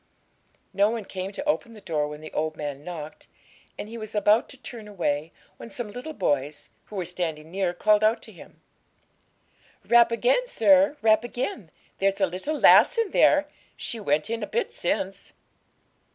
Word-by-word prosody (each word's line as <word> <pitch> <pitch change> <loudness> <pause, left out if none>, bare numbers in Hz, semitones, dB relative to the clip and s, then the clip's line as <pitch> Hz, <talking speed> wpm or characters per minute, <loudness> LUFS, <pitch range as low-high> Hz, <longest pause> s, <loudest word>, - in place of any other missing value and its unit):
No 200 +2 +3
one 225 -2 -4
came 190 +1 -5
to 285 +8 -6
open 235 -6 -1
the - - -11
door 155 -6 -2
when 150 0 -9
the 155 - -10
old 155 0 -2
man 145 -1 -5
knocked, 155 -3 -8 0.5
and - - -6
he 230 +1 -8
was 215 0 -8
about 210 +2 +3
to 275 - -12
turn 235 -4 -9
away, 165 -6 -2 0.3
when - - -10
some 215 0 -6
little 250 +8 -7
boys, 145 -5 -2
who 210 - -12
were 185 -3 -2
standing 165 -3 -4
near, 190 -1 0
called 210 +4 +2
out 220 +2 +3
to - - -11
him - - -16 1.2
'Rap 235 0 +5
again, - - +2
sir, 290 - +4
rap 220 0 +4
again; 240 -6 -4 0.3
there's 195 +1 +1
a 195 - +4
little 190 - -4
lass - - +6
in 455 -5 0
there; 295 0 +4 0.3
she 230 - -4
went 155 -4 0
in 230 0 -3
a 210 - -3
bit 475 - -2
since.' 195 +1 -3
205 Hz, 180 wpm, -25 LUFS, 170-235 Hz, 1.2 s, lass